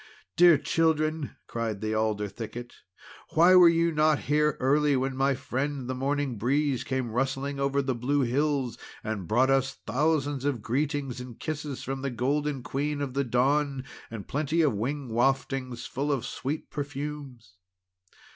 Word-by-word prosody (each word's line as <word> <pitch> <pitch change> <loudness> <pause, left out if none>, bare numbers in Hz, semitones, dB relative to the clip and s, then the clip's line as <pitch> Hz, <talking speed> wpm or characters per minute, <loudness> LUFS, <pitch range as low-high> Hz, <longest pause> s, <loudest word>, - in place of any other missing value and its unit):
"Dear 175 -3 +7
children!" 155 0 0
cried 115 -3 -3
the 110 +1 -2
Alder 110 -1 0
thicket, 120 +3 -7 0.6
"why 170 +3 +7
were 180 -2 +9
you 170 0 +2
not 155 -1 +3
here 150 +1 +1
early, 145 +2 +3
when 130 0 -1
my 135 +1 +2
friend 135 +1 -3
the 130 - -2
Morning 135 -2 -1
Breeze 135 +2 +1
came 130 -3 -2
rustling 135 +3 -1
over 140 0 +1
the 130 -1 0
blue 135 +4 0
hills, 135 0 0 0.2
and 105 -5 -4
brought 130 +5 +3
us 135 0 +1
thousands 145 +2 0
of 135 -7 -1
greetings 135 0 -1
and 125 -2 -10
kisses 150 -3 -4
from 135 +1 -4
the 140 - -1
Golden 135 +3 -1
Queen 145 +3 -2
of 140 -3 -3
the 140 +1 +1
Dawn, 135 +2 +1 0.3
and 110 -3 -7
plenty 155 +3 +1
of 145 -6 +3
wing 130 +6 -3
waftings 130 +1 0
full 145 +3 -2
of 130 -4 -1
sweet 135 +4 -4
perfumes!" 140 -8 -6
135 Hz, 155 wpm, -28 LUFS, 125-145 Hz, 0.6 s, were